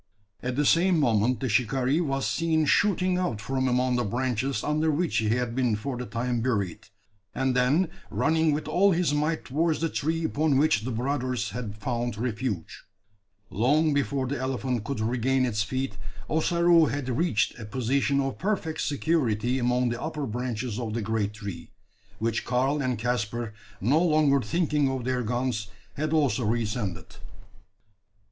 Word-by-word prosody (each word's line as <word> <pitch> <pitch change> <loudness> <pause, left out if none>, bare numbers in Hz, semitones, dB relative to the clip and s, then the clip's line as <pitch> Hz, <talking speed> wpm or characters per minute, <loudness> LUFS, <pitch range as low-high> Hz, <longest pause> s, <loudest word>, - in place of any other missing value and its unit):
At 125 0 -3
the 145 +2 +1
same 175 +3 +4
moment 120 -2 +2
the 130 - 0
shikaree 130 +6 +1
was 135 -4 -1
seen 160 -2 +1
shooting 185 +2 +2
out 125 -13 -1
from 130 +4 -1
among 125 0 +2
the 120 - +1
branches 130 +3 -1
under 155 +2 +1
which 160 +3 0
he 110 -1 +1
had 120 +1 0
been 125 -3 +1
for 125 +5 -4
the 125 0 -5
time 120 0 -1
buried; 100 -8 -2 0.5
and, 130 -1 0
then 140 +9 +3 0.2
running 160 0 +2
with 150 +1 -2
all 185 +5 +4
his 170 -3 +1
might 155 +2 0
towards 160 +4 0
the 165 +1 0
tree 160 +3 -1
upon 150 -2 +1
which 145 -6 +3
the 120 - -4
brothers 125 -1 -1
had 105 -2 -5
found 120 0 -2
refuge. 115 -5 -3 0.7
Long 145 - +2
before 140 -1 0
the 140 +1 -3
elephant 130 -2 -2
could 140 -5 -3
regain 130 +3 +1
its 110 -4 -1
feet, 130 0 -2 0.3
Ossaroo 170 +1 +4
had 140 0 -3
reached 130 -3 0
a 110 - -6
position 130 +5 0
of 135 -1 -2
perfect 185 -5 -1
security 130 -6 0
among 125 0 +1
the 120 0 -4
upper 155 -2 -3
branches 120 -1 -3
of 115 -3 -3
the 115 - -2
great 105 -1 -1
tree; 100 -6 -7 0.5
which 115 +1 -1
Karl 130 +4 +1
and 125 -3 -1
Caspar, 120 -1 -2 0.3
no 135 - +3
longer 150 -4 +3
thinking 150 +1 +1
of 130 -2 -3
their 125 0 0
guns, 120 -1 -1 0.3
had 155 +1 -2
also 145 -5 +2
re 115 +2 +1
ascended. 105 -4 -4
130 Hz, 165 wpm, -27 LUFS, 115-150 Hz, 0.7 s, same